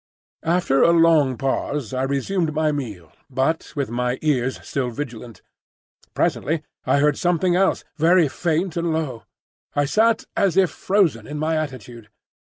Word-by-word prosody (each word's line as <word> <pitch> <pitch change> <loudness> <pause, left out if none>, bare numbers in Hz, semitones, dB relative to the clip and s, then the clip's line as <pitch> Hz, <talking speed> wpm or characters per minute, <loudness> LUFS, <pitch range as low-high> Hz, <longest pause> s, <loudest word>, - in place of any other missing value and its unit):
After 170 -6 +2
a - - +6
long 165 -6 +4
pause 135 -2 -2
I 130 - -1
resumed 155 +5 -1
my 155 0 +2
meal, 105 - -6 0.2
but 135 +5 -1
with 140 -6 -2
my 125 +1 -1
ears 130 -4 0
still 130 -3 -1
vigilant. 120 -2 -7 0.7
Presently 155 0 0 0.2
I - - +3
heard 145 0 +2
something 175 0 +2
else, 190 +1 +2
very 165 +1 +4
faint 170 +4 -1
and 170 -1 -1
low. 150 -7 -3 0.5
I 145 - +2
sat 220 +9 +2
as 195 -2 +1
if 190 -3 +4
frozen 175 - +1
in 150 - -5
my 155 +2 0
attitude. 125 -7 -6
150 Hz, 150 wpm, -22 LUFS, 130-170 Hz, 0.7 s, a